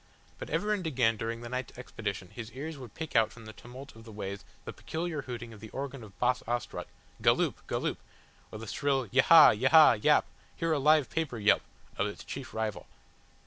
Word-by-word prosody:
But - - -7
ever 210 0 0
and 185 -5 -2
again 120 -6 +2
during 115 +2 -4
the 120 - -7
night's 125 -1 -5
expedition 100 -7 -5
his 120 -1 -8
ears 155 +5 -6
would 125 -6 -11
pick 160 -1 -6
out 110 -1 +4
from 115 -1 -13
the 110 - -9
tumult 130 +4 -12
of 115 - -13
the 110 - -12
ways 100 -3 -6 0.2
the - - -6
peculiar 160 -2 -4
hooting 120 -3 -7
of 110 - -13
the 110 +1 -10
organ 135 -1 -6
of 100 -4 -14
Boss 125 +1 +1
Ostrog, 120 0 -3 0.3
"Galloop, - - +3
Galloop!" - - -2 0.5
or - - -7
the 110 - -8
shrill 135 +3 0
"Yahaha, 150 +6 +8
Yaha 130 -1 +6
Yap! - - +5 0.3
Hear 165 0 -1
a 155 - +2
live 150 0 +4
paper 160 -7 -2
yelp!" 105 -1 +4 0.4
of 95 - +2
its 105 - -8
chief 135 -1 -7
rival. 110 -2 -4
125 Hz, 200 wpm, -30 LUFS, 110-140 Hz, 0.5 s, Yahaha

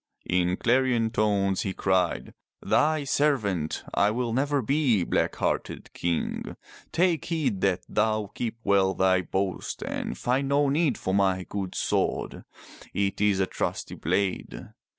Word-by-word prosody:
In 90 0 +1
clarion 120 -2 +2
tones 100 -4 +1
he 95 - -2
cried, 95 -4 0 0.3
Thy 155 0 +2
servant 110 - 0
I 100 - +3
will 120 +1 -1
never 140 +1 +1
be, 130 - +2
black - - 0
hearted - - -3
King. 85 -1 -2 0.3
Take 170 -4 +2
heed 135 - -1
that 95 -2 +1
thou 110 -1 0
keep 115 -1 -3
well 95 -1 +3
thy 95 0 +3
boast 95 +1 -3
and - - -4
find 135 +3 0
no 140 0 +3
need 145 -3 +1
for 95 - -2
my 95 -2 +2
good 95 -3 -4
sword. - - -1 0.5
It 100 0 0
is 105 -2 +3
a 95 - +3
trusty - - -3
blade." 100 -2 -2
105 Hz, 140 wpm, -26 LUFS, 95-135 Hz, 0.5 s, I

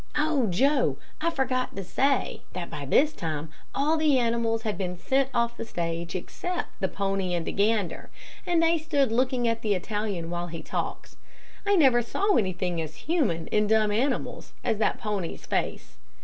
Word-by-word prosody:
"Oh, 295 -5 +2
Joe, 250 - +2 0.2
I 335 - +2
forgot 260 -4 -1
to 195 - -4
say, 270 +8 +1
that 175 -1 -5
by 145 - -5
this 290 - +4
time 155 -2 -4 0.2
all 300 +4 +2
the 305 -3 +4
animals 230 -2 +1
had 215 -3 -1
been 180 -1 -3
sent 265 +8 +1
off 235 -1 +1
the - - -5
stage 170 -5 -3
except 350 - -3
the 190 - +1
pony 195 -2 -1
and 170 -1 -2
the - - -2
gander, 205 -3 0 0.3
and 340 -2 +2
they 330 0 +4
stood 290 -5 +1
looking 250 0 +2
at 230 0 0
the 210 -3 +1
Italian 195 -3 -3
while 175 0 -2
he 165 -1 -7
talked. - - -4 0.5
I 405 - +5
never 265 -8 +5
saw 395 - +1
anything 180 -4 0
as 155 0 -6
human 250 - +1
in 210 0 +2
dumb 215 -1 +3
animals 255 +6 -1
as 220 -3 0
that 220 - +2
pony's 205 -5 -3
face. - - -2
220 Hz, 175 wpm, -27 LUFS, 180-270 Hz, 0.5 s, I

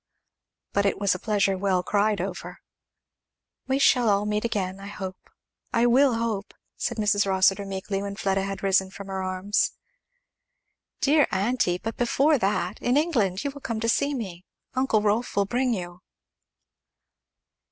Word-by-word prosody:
But 200 0 +2
it - - 0
was 200 -2 +2
a 185 - -5
pleasure 200 -2 +1
well 185 -1 0
cried 205 +1 +1
over. 185 0 -5 1.1
"We 265 0 +1
shall 250 -4 +4
all 200 0 +2
meet 210 0 -1
again, 195 -5 -2
I 200 - -8
hope, 190 -2 -8 0.4
I 235 0 +3
will 255 +1 +4
hope, 225 -3 -3
" - - -54
said 235 - -3
Mrs. 205 -1 +2
Rossitur 195 +1 +3
meekly 195 0 -3
when 200 0 -5
Fleda 195 -2 0
had 195 0 -5
risen 190 -1 +2
from 195 +1 -10
her 190 0 -3
arms; 185 +3 0 1.3
"Dear 295 +1 +4
aunty! 190 -2 +1
but 225 +4 -6
before 275 +4 +2
that 195 -1 -1
in 245 +3 +2
England 225 - +1
you 280 - -2
will 285 +1 -12
come 230 -4 -3
to 230 - -1
see 280 +5 +1
me 185 -8 -6 0.3
Uncle 255 -5 +1
Rolf 215 +3 0
will 200 0 +2
bring 250 +4 0
you." 175 -4 -5
205 Hz, 165 wpm, -25 LUFS, 190-235 Hz, 1.3 s, shall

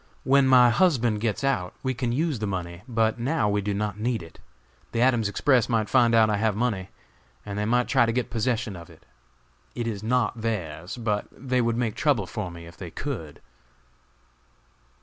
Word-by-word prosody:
When 135 +1 +4
my 125 -2 +7
husband 120 - +2
gets 115 +2 -1
out 90 -10 0
we 130 -1 0
can 120 0 -2
use 150 0 0
the 105 - -2
money; 85 -2 -4
but 115 -1 +1
now 125 -2 +1
we 105 0 +1
do 105 +1 -2
not 105 0 -2
need 115 -3 -1
it. 80 - -14 0.5
The 115 - 0
Adams 120 -4 +3
Express 130 +1 +2
might 110 -3 0
find 120 -3 +4
out 110 -1 +6
I 105 -1 +1
have 110 -1 +1
money, 105 -5 -1 0.6
and 100 - -5
they 105 0 -1
might 125 +2 +2
try 130 -4 +3
to - - +1
get 125 +1 -2
possession 115 -3 -1
of 85 -1 -11
it. - - -18 0.7
It 120 - -3
is 105 -4 -3
not 115 0 0
theirs, 90 -5 -4
but 105 -3 -1
they 125 -1 -1
would 115 -1 0
make 115 -3 0
trouble 140 -10 +1
for 95 +1 -5
me 85 -1 -10
if 85 0 -13
they 90 -2 -7
could." 80 - -6
115 Hz, 195 wpm, -25 LUFS, 105-125 Hz, 0.7 s, my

